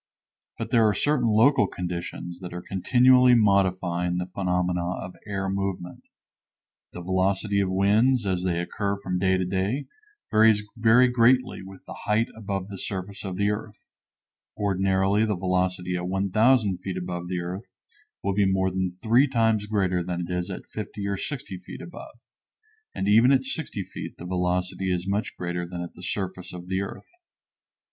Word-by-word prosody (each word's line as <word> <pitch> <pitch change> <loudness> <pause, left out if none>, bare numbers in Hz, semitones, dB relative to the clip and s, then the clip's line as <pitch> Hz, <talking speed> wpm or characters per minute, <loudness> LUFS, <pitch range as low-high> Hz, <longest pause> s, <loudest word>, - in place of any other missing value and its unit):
But - - -5
there 115 -2 +5
are 105 - +2
certain 145 -1 +1
local 110 +1 +4
conditions 85 -1 -5
that 90 -2 -8
are 90 - -6
continually 125 +5 +5
modifying 95 -4 +2
the 90 - -1
phenomena 90 -1 -1
of 90 - -7
air 95 -1 -2
movement. 95 -2 -4 0.8
The 90 - -8
velocity 95 +2 +1
of 95 -2 +1
winds 105 +6 +3
as 95 -2 0
they 90 -2 0
occur 100 +3 -2
from 90 -2 -3
day 95 0 +3
to 95 - -1
day 100 +9 -1 0.5
varies 110 -1 +5
very 115 +2 +5
greatly 125 0 +3
with 95 0 -12
the - - -8
height 105 +2 0
above 100 -3 -4
the 100 -2 -8
surface 95 0 -5
of 95 -2 -5
the 100 +1 +2
earth; 105 0 -7 0.7
ordinarily 95 +1 +2
the 105 -3 0
velocity 90 0 0
at 90 0 -3
1000 100 +2 +2
feet 95 0 -5
above 90 -1 -4
the 90 -1 -2
earth 90 +4 -6 0.5
will 100 - 0
be 100 -1 +2
more 95 0 +1
than 95 0 -1
three 115 +9 +3
times 115 -5 +1
greater 95 -4 +1
than 90 0 -3
it 90 - -5
is 90 0 -2
at - - -6
50 100 -1 -5
or 100 0 -1
60 110 -7 -5
feet 90 - -10
above, 175 - -10 0.8
and 95 - -2
even 115 +5 +6
at 135 -1 +4
60 130 -6 -4
feet 95 - -8
the 90 - -9
velocity 90 +1 -1
is 90 +1 -2
much 100 +2 -2
greater 85 0 -3
than 90 0 -5
at 85 - -8
the - - -13
surface 95 -1 -4
of 90 0 -9
the 95 0 0
earth. 100 - -8
95 Hz, 170 wpm, -25 LUFS, 90-105 Hz, 0.8 s, even